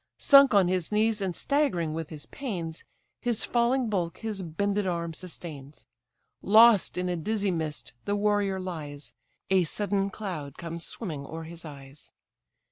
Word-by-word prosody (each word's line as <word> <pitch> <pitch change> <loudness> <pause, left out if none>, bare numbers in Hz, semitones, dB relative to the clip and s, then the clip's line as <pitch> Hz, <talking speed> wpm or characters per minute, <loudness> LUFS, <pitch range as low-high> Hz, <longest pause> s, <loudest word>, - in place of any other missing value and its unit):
Sunk 275 -5 +7
on 195 -3 +5
his 180 -1 0
knees, 215 0 +2
and 185 -3 -2
staggering 260 - 0
with 160 -1 -4
his 150 -2 -8
pains, 175 - -5 0.4
His 240 -3 +1
falling 240 +1 +2
bulk 180 -6 -1
his 215 -3 -3
bended 200 +4 -1
arm 170 -2 -2
sustains; 155 -4 -8 0.6
Lost 220 -1 +6
in 180 0 -1
a 180 - 0
dizzy 200 +4 -1
mist 160 -7 -3
the 205 - 0
warrior 205 -2 +1
lies; 150 -6 -5 0.4
A 190 -1 +5
sudden 200 +3 0
cloud 175 -9 -6
comes 170 0 -5
swimming 155 -11 -5
o'er 165 0 -6
his 165 +1 -9
eyes. 140 -1 -11
185 Hz, 150 wpm, -28 LUFS, 160-210 Hz, 0.6 s, Sunk